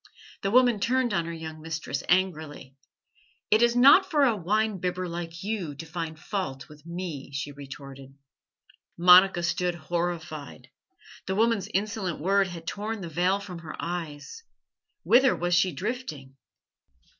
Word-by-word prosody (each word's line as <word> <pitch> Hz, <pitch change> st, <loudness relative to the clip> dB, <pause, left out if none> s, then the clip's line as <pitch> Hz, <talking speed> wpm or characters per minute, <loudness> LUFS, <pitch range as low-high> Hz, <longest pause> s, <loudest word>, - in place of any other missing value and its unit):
The 195 Hz, -, 0 dB
woman 245 Hz, -1 st, +4 dB
turned 245 Hz, +1 st, +1 dB
on 170 Hz, -2 st, 0 dB
her 170 Hz, -, -5 dB
young 160 Hz, -1 st, -7 dB
mistress 160 Hz, -3 st, -4 dB
angrily. 155 Hz, -7 st, -1 dB, 0.8 s
"It 215 Hz, +2 st, +5 dB
is 240 Hz, 0 st, +4 dB
not 280 Hz, +10 st, +7 dB
for 295 Hz, -3 st, +3 dB
a 240 Hz, -5 st, +4 dB
wine 210 Hz, +2 st, 0 dB
bibber 180 Hz, +1 st, -2 dB
like 170 Hz, 0 st, -6 dB
you 195 Hz, -8 st, -3 dB
to 140 Hz, -, -8 dB
find 160 Hz, -1 st, -5 dB
fault 155 Hz, -9 st, -4 dB
with 150 Hz, -2 st, -16 dB
me," 170 Hz, -6 st, -6 dB
she 135 Hz, +1 st, -4 dB
retorted. 135 Hz, -1 st, -11 dB, 0.8 s
Monica 180 Hz, +1 st, +7 dB
stood 175 Hz, +1 st, 0 dB
horrified. 155 Hz, -6 st, -4 dB, 0.6 s
The 190 Hz, -, -1 dB
woman's 225 Hz, -2 st, +1 dB
insolent 195 Hz, -3 st, -2 dB
word 195 Hz, +4 st, +2 dB
had 170 Hz, -2 st, -9 dB
torn 210 Hz, +3 st, -4 dB
the 170 Hz, -, -6 dB
veil 180 Hz, +5 st, +1 dB
from 185 Hz, -4 st, -8 dB
her 160 Hz, -2 st, -8 dB
eyes. 170 Hz, -, -5 dB, 0.6 s
Whither 260 Hz, +2 st, +5 dB
was 175 Hz, 0 st, -1 dB
she 180 Hz, +1 st, +3 dB
drifting? 175 Hz, -, -5 dB
175 Hz, 145 wpm, -27 LUFS, 160-205 Hz, 0.8 s, not